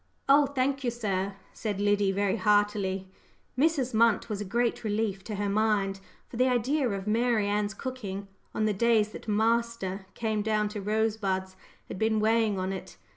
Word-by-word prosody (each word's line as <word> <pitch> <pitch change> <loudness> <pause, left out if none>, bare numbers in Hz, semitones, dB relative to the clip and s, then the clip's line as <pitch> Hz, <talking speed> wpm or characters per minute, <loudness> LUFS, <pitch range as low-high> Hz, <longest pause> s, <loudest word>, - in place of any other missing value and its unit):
"Oh, 280 +1 +6
thank 270 0 -1
you, 245 - +1
sir," 200 -4 -2 0.2
said 205 -3 -3
Liddy 205 -1 +2
very 200 +2 0
heartily. 205 -3 +1 0.5
Mrs. 275 -3 +1
Munt 230 0 +3
was 210 -1 -3
a - - -3
great 235 +5 0
relief 210 -2 -1
to 215 - -4
her 205 0 -1
mind, 200 -2 +1 0.3
for 235 - -9
the 255 +1 +4
idea 255 +2 +1
of 195 -2 -3
Mary 225 0 +2
Ann's 205 0 -1
cooking 200 -6 -5 0.3
on 215 - +1
the 215 - +2
days 220 0 +3
that 215 - -10
"master" 220 -3 0
came 220 -2 -1
down 210 0 +1
to 210 -1 -5
Rosebuds 205 -3 -1 0.3
had - - -7
been 220 0 +2
weighing 220 -1 +2
on 185 +1 -2
it. 185 -1 -8
215 Hz, 175 wpm, -28 LUFS, 200-230 Hz, 0.5 s, Oh